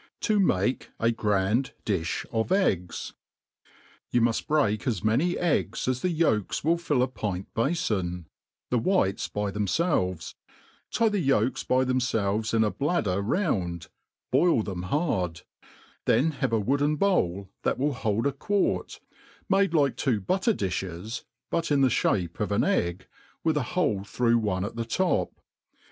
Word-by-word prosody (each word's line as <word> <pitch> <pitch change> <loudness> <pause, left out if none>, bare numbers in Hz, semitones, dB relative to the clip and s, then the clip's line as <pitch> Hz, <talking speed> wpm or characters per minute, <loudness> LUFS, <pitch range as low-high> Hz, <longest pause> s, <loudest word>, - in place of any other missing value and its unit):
Ti 215 -2 +1
mate 125 - +1
a 115 +1 +3
grand 105 +3 0
Dtjh 90 -6 -1
of 110 +7 -1
Eggs. 95 - 0 1.0
YOy 120 - +2
muft 115 -1 +1
break 120 -9 +1
as 110 -7 -1
many 130 +12 +2
eggs 125 - 0
as 130 -1 0
the 180 - +1
volks 155 - +1
will 165 +3 +2
fill 145 -7 +1
a - - +1
pint 100 -7 -5
bafon, 105 - -1 0.5
the 125 - +3
whites 115 - +1
by 105 -1 -2
themfelves, 95 - 0 0.6
tie 230 - +2
the 210 -2 +1
yolks 135 - +1
by 130 +1 +2
themfelves 110 -4 0
in 115 -1 +3
a 105 - +1
bladder 115 - 0
round, 95 - -1 0.4
boil 170 -11 +4
them 95 -4 -4
hard: 95 - 0 0.6
then 160 +4 +3
have 135 -3 -2
a 115 - +2
wooden 140 +7 +1
bowl 100 - 0
that - - 0
will 145 +2 0
hold 110 -1 -1
a 140 - +3
quart, 200 +9 -1 0.5
made 195 -2 +3
like 140 -4 +3
two 125 -7 +1
butter 190 - +1
difhes, 95 +3 -4 0.3
but 165 0 0
in 145 -2 +3
the 135 - +5
fhape 90 -7 0
of - - -1
an - - +2
egg, 85 +2 0 0.4
with 160 -1 +2
a 150 - +2 0.2
hole 105 - +1
through 120 +3 +2
one 100 -3 -1
at 110 - -6
the 115 - -2
top. 115 - 0
115 Hz, 155 wpm, -27 LUFS, 100-150 Hz, 1.0 s, the